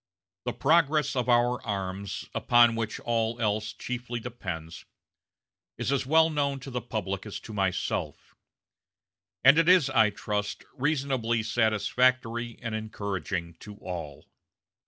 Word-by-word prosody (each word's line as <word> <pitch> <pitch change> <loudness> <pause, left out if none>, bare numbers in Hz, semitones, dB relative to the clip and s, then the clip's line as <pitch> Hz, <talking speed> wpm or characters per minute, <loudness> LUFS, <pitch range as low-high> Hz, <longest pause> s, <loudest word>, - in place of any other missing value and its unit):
The - - -1
progress 150 -1 +2
of 125 -1 -1
our 120 +1 +3
arms, 100 -2 -4
upon 120 -1 +5
which 115 -1 -3
all 115 0 -1
else 105 -1 0
chiefly 120 -1 -5
depends, 90 -9 -6 0.9
is - - -1
as 135 -2 0
well 160 +2 +5
known 140 -2 0
to 135 - -8
the 125 0 -2
public 105 -5 -3
as 105 - -6
to 110 - -10
myself; 95 -3 -2 1.1
and 140 +5 +8
it 165 +1 +4
is, 175 -7 +5
I 110 -4 +5
trust, 105 0 -3
reasonably 130 -5 0
satisfactory 120 +1 +1
and 115 -2 -3
encouraging 100 -5 -4
to 105 -1 -10
all. 85 -8 -7
115 Hz, 130 wpm, -28 LUFS, 105-130 Hz, 1.1 s, and